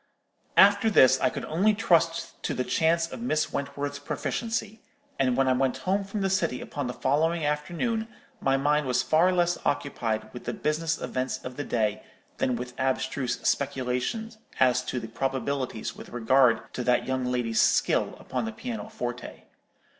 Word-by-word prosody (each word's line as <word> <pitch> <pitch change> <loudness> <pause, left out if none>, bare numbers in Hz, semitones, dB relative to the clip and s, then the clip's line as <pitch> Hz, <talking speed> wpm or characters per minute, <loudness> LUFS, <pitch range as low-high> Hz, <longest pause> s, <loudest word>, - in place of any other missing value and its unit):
"After 200 +3 +6
this 130 - +6
I - - +4
could - - -5
only 200 +7 +2
trust 170 -6 +1
to - - -2
the 125 - 0
chance 165 +4 +1
of - - -7
Miss 155 -10 0
Wentworth's 140 0 -3
proficiency; 220 +8 -3 0.4
and 130 -2 +2
when 135 0 +3
I 130 - +4
went 130 0 +1
home 195 +2 +1
from 195 +1 -4
the 195 - +2
city 170 -9 0
upon 145 -3 -4
the 125 - -3
following 155 +6 +1
afternoon, 175 +10 -1 0.3
my 135 0 +2
mind 145 +1 +1
was 125 0 +2
far 160 +8 +4
less 175 -1 +1
occupied 115 -6 -2
with 125 - -9
the - - -2
business 155 +2 -1
events 130 0 -2
of 125 0 -6
the 145 - -3
day 110 -5 0 0.4
than 125 - +1
with 125 +1 -6
abstruse 130 -1 -1
speculations 140 - -1 0.2
at 130 -1 +5
to 125 - -2
the 115 - -7
probabilities 130 0 -3
with - - -11
regard 120 +1 +2
to 125 - -3
that 125 0 +2
young 130 0 -1
lady's 120 -3 +1
skill - - +2
upon - - -3
the 225 - -3
piano 225 -1 -6
forte. 125 - -6
140 Hz, 170 wpm, -27 LUFS, 125-175 Hz, 0.4 s, After